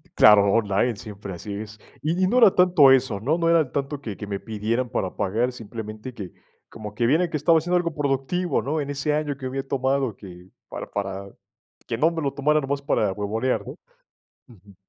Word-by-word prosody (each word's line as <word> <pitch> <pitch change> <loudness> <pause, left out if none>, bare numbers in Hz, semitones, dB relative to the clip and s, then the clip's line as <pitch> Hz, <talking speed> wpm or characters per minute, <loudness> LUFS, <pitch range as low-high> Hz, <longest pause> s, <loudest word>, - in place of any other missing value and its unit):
claro, 100 -2 +7
online, 110 +1 +1
siempre 100 -2 -8
así 100 +4 -7
es. 105 +1 -7 0.2
Y 165 +5 -1
y - - +4
no 245 +6 +3
era 200 - +7
tanto 180 -7 +6
eso, 130 -6 +2
¿no? 150 +9 +1
No 165 -1 +1
era 160 -6 +3
tanto 140 +1 -3
que 110 -6 -6
que 105 - -7
me 100 -1 -3
pidieran 115 +3 -2
para 95 -6 -3
pagar, 110 +6 0
simplemente 110 +1 -8
que, 100 -6 -8 0.4
como 105 -1 -9
que 120 - 0
vieran 165 +6 +2
que 155 - -2
estaba 165 +3 +4
haciendo 175 +3 0
algo 170 -2 -1
productivo, 145 +5 -1
¿no? 150 +2 -2
En 140 - -5
ese 145 +1 -1
año 150 -2 -2
que 130 - -8
había 135 +1 -3
tomado 135 -4 0
que 90 -2 -12 0.2
para - - -6
para 100 -1 -4 0.6
que 115 -1 -3
no 160 +4 +4
me 165 -1 -4
lo 140 -2 -1
tomara 150 +2 +2
nomás 140 0 -2
para 110 -8 +1
huevonear, 110 +6 -2
¿no? - - -7 0.7
Ujú. 100 -3 -18
130 Hz, 205 wpm, -24 LUFS, 105-150 Hz, 0.7 s, claro